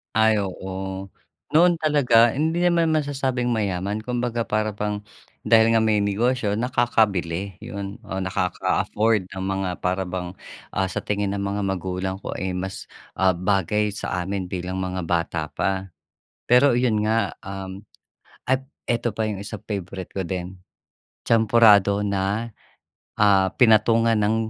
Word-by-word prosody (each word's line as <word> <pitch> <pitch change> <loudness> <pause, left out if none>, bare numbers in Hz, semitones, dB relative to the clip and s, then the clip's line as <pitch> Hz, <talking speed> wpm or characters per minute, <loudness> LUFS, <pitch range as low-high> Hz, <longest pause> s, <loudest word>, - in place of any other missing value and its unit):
Ay, 110 0 +4
oo. 95 +1 -6 0.4
Noon 175 +3 +6
talaga, 125 -7 +4
hindi 160 +3 0
naman 170 -2 +3
masasabing 135 -5 0
mayaman. 100 -2 -1
Kumbaga, 120 -1 -1
para 110 0 0
bang 105 0 -2 0.4
dahil 110 0 +4
nga 115 - +4
may 105 -2 +2
negosyo 110 +2 0
nakakabili, 100 -6 0
yun 100 0 -6
o 95 - -4
nakaka-afford 95 +2 0
ng 95 - -6
mga 95 -1 -1
para 95 +1 0
bang, 90 0 -5 0.4
ah, 95 - 0
sa 90 - -3
tingin 100 -1 -2
ng 100 - -2
mga 100 +1 -2
magulang 95 0 -2
ko - - -6
ay 95 0 -3
mas, 95 +1 -5 0.3
ah, 95 -1 +3
bagay 100 +3 +1
sa 90 -2 -3
amin 95 -1 -3
bilang 90 0 -3
mga 95 0 -3
bata 85 -2 -1
pa. 95 0 -2 0.6
Pero, 125 +1 +6
iyon 120 -3 +2
nga, 115 +1 +1
um, 95 0 -7 0.7
ay 130 0 +3 0.3
ito 120 -2 -1
pa 110 - -1
yung 105 -3 -4
isa 100 - -6
favorite 95 -3 -6
ko 95 -3 -4
din, 90 +1 -5 0.6
Champurado 105 -3 +5
na, 100 +3 -1 0.7
ah, 95 -3 +4
pinatungan 115 -1 +5
ng 105 +1 +2
100 Hz, 140 wpm, -23 LUFS, 95-115 Hz, 0.7 s, Noon